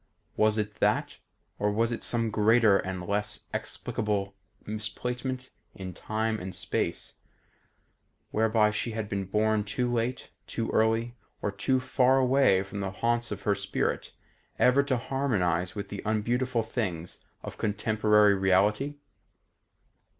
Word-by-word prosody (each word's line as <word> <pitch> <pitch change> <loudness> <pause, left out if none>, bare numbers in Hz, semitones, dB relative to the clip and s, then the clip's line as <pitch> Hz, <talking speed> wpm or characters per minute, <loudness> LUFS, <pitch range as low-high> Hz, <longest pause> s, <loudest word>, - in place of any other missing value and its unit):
Was 110 0 +3
it 105 -1 -3
that, - - +1 0.4
or 105 0 +1
was 115 +3 +1
it 120 - -4
some 115 -2 0
greater 110 -1 +4
and 95 -1 -4
less 105 +2 -1
explicable 100 -2 -2 0.3
misplacement 125 +4 -4 0.2
in 95 -1 -6
Time 110 +2 -2
and 90 0 -6
Space, - - -3 1.1
whereby 110 -1 +3
she 110 +2 -2
had 110 -1 -3
been 100 -1 -2
born 105 +2 +1
too 120 +4 -1
late, 120 +2 -2 0.2
too 115 -1 -3
early, 115 +2 +1 0.3
or 105 - 0
too 130 +6 +1
far 130 0 +3
away 130 -7 +4
from 100 +1 -7
the 100 -1 -2
haunts 120 +4 -1
of 100 -2 -6
her 105 - +3
spirit 100 0 -2 0.5
ever 125 +3 +5
to 140 -2 0
harmonise 95 -10 0
with 100 -1 -5
the 100 - -5
unbeautiful 120 +3 0
things 90 -7 -4 0.2
of - - -8
contemporary 105 0 +3
reality? 100 +9 +2
110 Hz, 135 wpm, -28 LUFS, 100-120 Hz, 1.1 s, ever